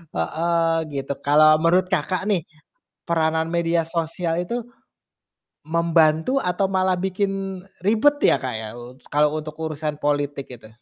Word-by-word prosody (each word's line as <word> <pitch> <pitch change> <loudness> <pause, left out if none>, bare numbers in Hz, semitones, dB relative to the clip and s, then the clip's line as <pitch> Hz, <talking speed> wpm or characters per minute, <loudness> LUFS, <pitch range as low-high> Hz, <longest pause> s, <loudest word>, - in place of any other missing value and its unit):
heeh, 165 - 0 0.2
gitu. 140 0 -3
Kalau 155 +1 +5
menurut 175 +3 +3
Kakak 180 +5 0
nih, 195 -5 +2 0.7
peranan 160 -1 +1
media 170 0 +1
sosial 165 0 -2
itu 235 +6 -4 1.0
membantu, 165 - +2
atau 180 +2 +1
malah 185 -1 +1
bikin 195 0 -2 0.2
ribet 225 +8 +4
ya, - - +6
Kak, 130 - -3
ya 110 -1 -6
u 120 +1 -11 0.2
kalau 150 0 +3
untuk 155 0 -7
urusan 155 -1 -3
politik 145 -1 -1
itu? 115 -3 -12
165 Hz, 135 wpm, -22 LUFS, 150-185 Hz, 1.0 s, ya